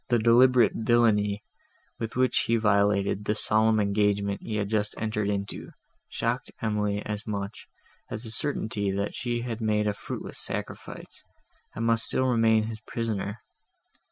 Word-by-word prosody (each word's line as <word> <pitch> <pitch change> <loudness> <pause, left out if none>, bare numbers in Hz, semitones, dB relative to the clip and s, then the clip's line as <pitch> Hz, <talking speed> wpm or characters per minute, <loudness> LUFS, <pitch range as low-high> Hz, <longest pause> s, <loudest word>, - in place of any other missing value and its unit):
The 120 - +4
deliberate 120 0 +5
villany, 110 -3 +2 0.6
with 115 -1 -4
which 130 0 +2
he 115 - +3
violated 100 -2 +2
the 105 - +1
solemn 110 +1 +3
engagement 100 -1 +1
he 110 - -4
had 105 -1 0
just 105 0 +1
entered 105 -2 -1
into, 100 -1 -3 0.4
shocked - - -2
Emily 105 -2 -1
as 105 +1 -5
much, 100 0 -5 0.4
as 110 - -3
the 110 - -5
certainty, 110 -5 -2
that 100 +1 -2
she 120 -1 -2
had 120 -2 -4
made 105 -1 +1
a 105 - +1
fruitless - - -6
sacrifice, - - -6 0.5
and 115 - -2
must 115 0 +2
still 130 - +1
remain 115 -3 +3
his 110 0 -5
prisoner. 110 -2 -4
110 Hz, 150 wpm, -27 LUFS, 105-115 Hz, 0.6 s, deliberate